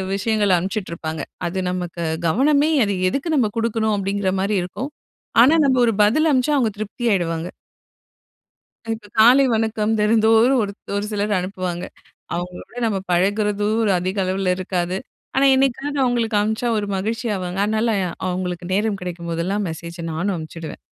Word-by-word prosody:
விஷயங்களை 205 -1 +1
அனுப்பிச்சுட்டுருப்பாங்க. 170 -5 -4 0.3
அது 190 +2 -3
நமக்கு 175 -1 -4 0.3
கவனமே 285 - +3
அது 200 -1 -1
"எதுக்கு 275 - -3
நம்ம 225 -5 +2
குடுக்கணும்?" 225 -2 +1
அப்படிங்கிற 195 -1 -1
மாரி 200 +1 0
இருக்கும். 255 +11 -6 0.5
ஆனா 280 +7 +6
நம்ம 260 -2 +3
ஒரு 230 - +3
பதில் 305 +10 +3
அனுப்ச்சா 265 +3 +2
அவங்க 235 -5 +2
திருப்தி 215 +3 -6
ஆயிடுவாங்க. 170 -2 -1 1.4
அ - - -12
இப்ப 210 -2 -13
காலை 250 +5 +7
வணக்கம் 220 -1 0
தினந்தோறும் 225 +4 +4
ஒருத் 200 -1 -7
ஒரு 205 - -1
சிலர் 205 0 0
அனுப்புவாங்க. 185 -1 -4 0.5
அவங்களோட 180 +5 -6
நம்ம 200 -3 0
பழகுறதும் 205 +3 +1
அதிக 185 +3 -3
அளவுல 185 0 0
இருக்காது. 180 -1 -2 0.4
ஆனா, 275 - +4
என்னைக்காவது 275 +2 0
அவங்களுக்கு 235 -3 +1
அனுப்பிச்சா 220 +3 0
ஒரு 205 - -2
மகிழ்ச்சி 225 +4 -2
ஆவாங்க. 180 0 -4
அதனால 220 +2 0 0.4
அவங்களுக்கு 180 -1 -3
நேரம் 205 -1 0
கிடைக்கும் 170 -1 -5
போதெல்லாம் 185 +5 -1
மெசேஜ 170 +1 -8 0.2
நானும் 185 +5 -1
அனுப்பிச்சுடுவேன். 160 0 -7
205 Hz, 145 wpm, -21 LUFS, 180-225 Hz, 1.4 s, காலை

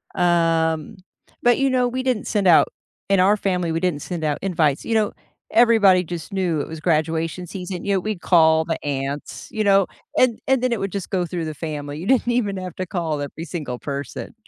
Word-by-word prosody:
Um, 165 -2 +1 0.4
but, 240 0 +4
you 275 0 +2
know, 250 -1 +2
we 255 +1 -3
didn't 250 -5 -1
send 205 -4 +1
out 170 - +6 0.4
in 195 -1 +4
our 200 +3 +4
family, 180 -4 -1
we 165 - 0
didn't 170 -5 -1
send 170 0 -5
out 150 -2 0
invites. 160 -7 0
You 230 - 0
know, 215 -2 +1 0.4
everybody 220 -6 +5
just 175 +3 -7
knew 175 -5 0
it - - -5
was 160 0 -7
graduation 165 +2 0
season; 180 -1 -6
you 200 - +1
know, 190 - +2
we'd 210 -1 -4
call 160 -2 +4
the 165 0 -3
aunts, 140 0 -4
you 215 - -1
know, 195 -2 +4 0.3
and 245 -3 +3
and 265 -2 +3
then 255 - +1
it 235 - 0
would 195 -1 -3
just 200 -1 -5
go 185 -3 0
through 170 -1 -4
the 155 - -4
family. 145 -1 -5
You 180 - -6
didn't 255 -1 +3
even 210 -5 0
have 185 -2 -6
to 185 - -2
call 165 -6 -2
every 145 +3 -6
single 150 -9 -5
person. 140 - -6
180 Hz, 215 wpm, -22 LUFS, 160-200 Hz, 0.4 s, out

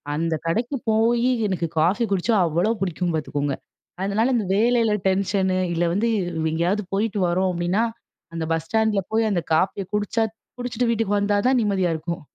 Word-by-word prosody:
அந்த 165 +1 0
கடைக்கு 235 +11 0
போயி, 235 +3 +3 0.2
எனக்கு 175 -4 -1
காஃபி 190 +9 +2
குடிச்சா 195 +4 +1
அவ்வளோ 170 +6 +1
பிடிக்கும், 175 -2 -1
பாத்துக்கோங்க. 145 -2 -2 0.5
அதனால 220 +6 +1
இந்த 215 -4 0
வேலையில 230 +1 +3 0.2
டென்ஷனு, 190 -1 +1 0.2
இல்ல 170 - 0
வந்து, 225 +4 +1 0.3
வ் - - +1
எங்கேயாவது 175 +6 0
போயிட்டு 205 +1 0
வரோம். 185 +2 +1
அப்டின்னா, 175 +5 0 0.5
அந்த 165 -1 -3
பஸ் 165 0 0
ஸ்டாண்டில 220 -1 +1
போய், 225 0 +3
அந்த 175 - +1
காஃபிய 190 +4 +1
குடிச்சா 210 +2 0 0.4
குடிச்சிட்டு 245 0 -1
வீட்டுக்கு 220 -3 +1
வந்தா 205 0 +1
தான் 255 -1 +3
நிம்மதியா 195 -4 +1
இருக்கும். 170 +2 -4
195 Hz, 160 wpm, -23 LUFS, 175-225 Hz, 0.5 s, போயி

